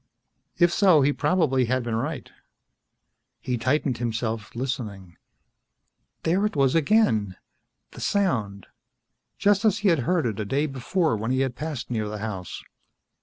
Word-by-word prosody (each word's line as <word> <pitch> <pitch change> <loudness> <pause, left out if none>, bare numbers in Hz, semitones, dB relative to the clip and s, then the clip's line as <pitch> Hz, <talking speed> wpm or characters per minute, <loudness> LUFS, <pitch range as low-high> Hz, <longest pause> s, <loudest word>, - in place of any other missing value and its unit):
If 175 -1 +4
so, 180 -8 +5
he 145 +2 +3
probably 145 -5 +1
had 130 +2 0
been 120 -1 -3
right. 140 +7 -3 1.1
He 125 - -2
tightened 130 +1 0
himself, 115 -2 -3
listening. 105 -8 -5 1.1
There 180 +5 +1
it 210 - -1
was 135 -2 +3
again. 145 - +2 0.6
The - - -11
sound. 110 - -1 0.7
Just 205 +1 +3
as 215 -2 +3
he - - +6
had 165 -4 +3
heard 165 +5 +1
it 110 -4 -2
a - - -1
day 140 +9 0
before 150 +2 0
when 110 +2 -3
he 130 +1 +1
had 130 -2 -1
passed 150 -5 -5
near 110 -3 -1
the 105 - -5
house. 100 -4 -6
130 Hz, 150 wpm, -25 LUFS, 110-160 Hz, 1.1 s, he